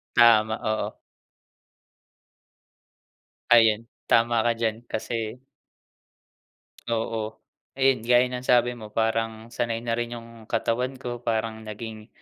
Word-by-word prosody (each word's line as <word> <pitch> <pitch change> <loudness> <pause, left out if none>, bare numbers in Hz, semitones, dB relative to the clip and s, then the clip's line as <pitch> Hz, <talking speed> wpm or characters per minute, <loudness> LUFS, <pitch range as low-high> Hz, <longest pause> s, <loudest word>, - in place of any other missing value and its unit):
Tama, 110 -2 +6
oo. 110 0 -1 2.6
Ayun, 115 -2 +6 0.2
tama 115 0 +3
ka 115 - +3
diyan 115 0 -2
kasi 115 +2 -4 1.5
Oo. 110 -1 -2 0.4
Ayun, 135 -2 +3
gaya 120 +1 +5
ng 125 0 -5
sabi 120 0 +4
mo 110 -3 -9
parang 115 +1 -1
sanay 115 -1 -1
na 115 - -1
rin 120 +1 -2
yung 115 -1 -12
katawan 125 +3 -1
ko 120 -2 -6
parang 110 -1 -2
naging, 110 +1 -8
115 Hz, 110 wpm, -25 LUFS, 110-120 Hz, 2.6 s, Tama